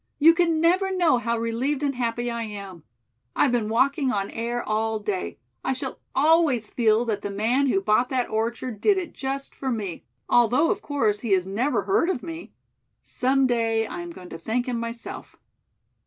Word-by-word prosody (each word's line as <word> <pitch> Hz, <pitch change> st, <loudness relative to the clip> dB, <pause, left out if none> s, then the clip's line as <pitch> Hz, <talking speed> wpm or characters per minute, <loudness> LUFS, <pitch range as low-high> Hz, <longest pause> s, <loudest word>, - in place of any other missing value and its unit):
"You 325 Hz, +3 st, +7 dB
can 335 Hz, -2 st, +2 dB
never 365 Hz, +4 st, +3 dB
know 350 Hz, -9 st, +3 dB
how 235 Hz, -1 st, -1 dB
relieved 245 Hz, +6 st, -1 dB
and 280 Hz, -1 st, +1 dB
happy 240 Hz, -1 st, -2 dB
I 235 Hz, 0 st, -3 dB
am. 200 Hz, -5 st, -7 dB, 0.5 s
I've 275 Hz, -, +3 dB
been 230 Hz, -3 st, 0 dB
walking 265 Hz, +4 st, +2 dB
on 200 Hz, -4 st, -2 dB
air 235 Hz, +1 st, -3 dB
all 220 Hz, +1 st, 0 dB
day. 205 Hz, -3 st, -3 dB, 0.3 s
I -, -, 0 dB
shall 260 Hz, +1 st, -6 dB, 0.2 s
always 290 Hz, -6 st, +3 dB
feel 225 Hz, 0 st, +2 dB
that 210 Hz, -3 st, -2 dB
the 205 Hz, -, -4 dB
man 230 Hz, +8 st, +1 dB
who 210 Hz, -7 st, +2 dB
bought 215 Hz, +5 st, +2 dB
that 255 Hz, -2 st, 0 dB
orchard 225 Hz, 0 st, -3 dB
did 405 Hz, -, +4 dB
it 355 Hz, -3 st, -4 dB
just 275 Hz, +1 st, -4 dB
for 270 Hz, -, -4 dB
me, 205 Hz, -8 st, -3 dB, 0.2 s
although 245 Hz, +7 st, +4 dB
of 410 Hz, -, -2 dB
course 225 Hz, -, 0 dB
he 215 Hz, -3 st, 0 dB
has 185 Hz, -1 st, +2 dB
never 230 Hz, +10 st, 0 dB
heard 385 Hz, -3 st, +2 dB
of 320 Hz, -10 st, -2 dB
me. 330 Hz, 0 st, -7 dB, 0.5 s
Some 265 Hz, +1 st, +1 dB
day 225 Hz, -2 st, +1 dB
I 350 Hz, +10 st, -6 dB
am 345 Hz, -, -7 dB
going 185 Hz, -, -11 dB
to 165 Hz, -, -8 dB
thank 230 Hz, +8 st, -1 dB
him, 245 Hz, -2 st, -2 dB
myself." 230 Hz, 0 st, -7 dB
240 Hz, 190 wpm, -25 LUFS, 220-280 Hz, 0.5 s, You